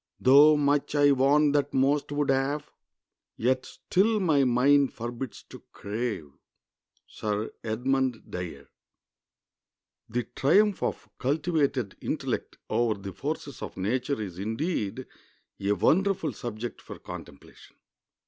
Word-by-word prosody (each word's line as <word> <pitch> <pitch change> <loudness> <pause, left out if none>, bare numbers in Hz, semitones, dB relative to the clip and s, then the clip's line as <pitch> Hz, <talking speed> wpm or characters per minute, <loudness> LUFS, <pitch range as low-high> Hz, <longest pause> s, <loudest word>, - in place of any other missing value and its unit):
Though 145 +4 +7
much 145 0 +1
I 145 0 +5
want 140 +2 +4
that 145 -1 0
most 140 +2 +2
would 145 -1 +1
have, 140 +3 -1 0.7
Yet 130 +2 +1
still 215 +4 +1
my 155 -7 +3
mind 135 +3 +4
forbids 120 +1 -6
to - - -10
crave." 105 - -4 0.7
—SIR 105 0 -3
EDMUND 125 +2 0
DYER. 85 -6 -6 1.4
The 120 +2 -1
triumph 180 - +2
of - - -3
cultivated 140 - 0
intellect - - -3
over 115 -4 +1
the 100 -1 -7
forces 145 -3 -5
of - - -7
nature 125 +7 -1
is 95 -4 -6
indeed 115 - -2 0.5
a 100 +1 +1
wonderful 180 - +2
subject 120 +1 -6
for - - -9
contemplation. 70 - -11
130 Hz, 115 wpm, -27 LUFS, 110-145 Hz, 1.4 s, Though